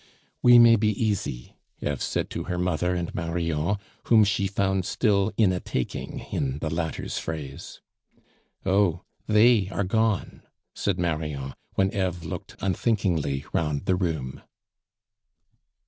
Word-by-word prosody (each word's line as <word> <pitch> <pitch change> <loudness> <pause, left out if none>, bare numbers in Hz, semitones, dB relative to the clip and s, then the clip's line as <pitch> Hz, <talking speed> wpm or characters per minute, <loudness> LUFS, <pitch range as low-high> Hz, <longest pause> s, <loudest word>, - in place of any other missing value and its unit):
"We 120 -1 +8
may 115 -1 +8
be 110 +1 +1
easy," 100 - -2 0.3
Eve 75 -3 -2
said - - -2
to - - -4
her 90 - -3
mother 90 0 0
and 85 -1 -3
Marion, 85 0 -1 0.3
whom 110 -2 +6
she 100 -1 +1
found 95 -1 0
still 100 0 +1
"in 105 -5 +4
a 90 - -1
taking," 65 -7 -4
in 65 0 -1
the 80 +1 -3
latter's 80 -1 -3
phrase. 75 -4 -7 0.8
"Oh! 95 -3 +2 0.2
they 105 -2 +5
are 100 - -1
gone," 110 +1 0 0.3
said 100 -3 -1
Marion, 75 -6 -2 0.2
when 95 0 +2
Eve 90 -3 -1
looked 80 - -7
unthinkingly 90 - 0
round 75 -3 -1
the 95 - +2
room. 80 -8 -3
90 Hz, 130 wpm, -26 LUFS, 80-100 Hz, 0.8 s, We